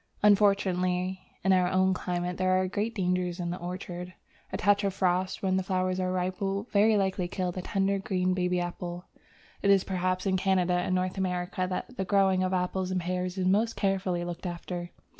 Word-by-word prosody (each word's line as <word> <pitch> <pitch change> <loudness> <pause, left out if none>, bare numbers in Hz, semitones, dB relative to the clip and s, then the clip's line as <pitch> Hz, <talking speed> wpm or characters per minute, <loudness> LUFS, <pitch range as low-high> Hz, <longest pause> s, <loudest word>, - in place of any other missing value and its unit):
Unfortunately, 190 -3 +3 0.2
in 190 - +4
our 180 -1 +3
own 185 0 +3
climate 180 -1 -3
there 185 0 +2
are 185 - +1
great 210 +4 -2
dangers 180 -2 0
in 175 -1 -2
the 180 - -4
orchard. 180 0 -6 0.4
A - - -2
touch 205 +1 +3
of 195 -1 -1
frost 185 0 0
when 190 -1 +2
the - - +1
flowers 185 0 -1
are 185 0 0
ripe 185 +1 -2
will 195 0 -1
very 210 +1 +4
likely 190 -2 0
kill 180 0 -2
the 185 - -5
tender, 195 +1 0
green, 185 -1 0
baby 180 -1 0
apple. 175 0 -5 0.6
It 200 - +2
is 195 -1 +5
perhaps 185 0 -1
in 190 -1 +2
Canada 185 -1 +2
and 180 +1 +1
North 185 +1 -1
America 185 0 -1
that 250 +7 -5
the 190 - 0
growing 190 -1 +3
of 185 0 0
apples 185 0 -1
and 185 0 0
pears 180 +1 -2
is 185 - 0
most 215 +5 +2
carefully 190 -3 0
looked 175 +1 -5
after. 175 0 -5
185 Hz, 195 wpm, -28 LUFS, 180-195 Hz, 0.6 s, is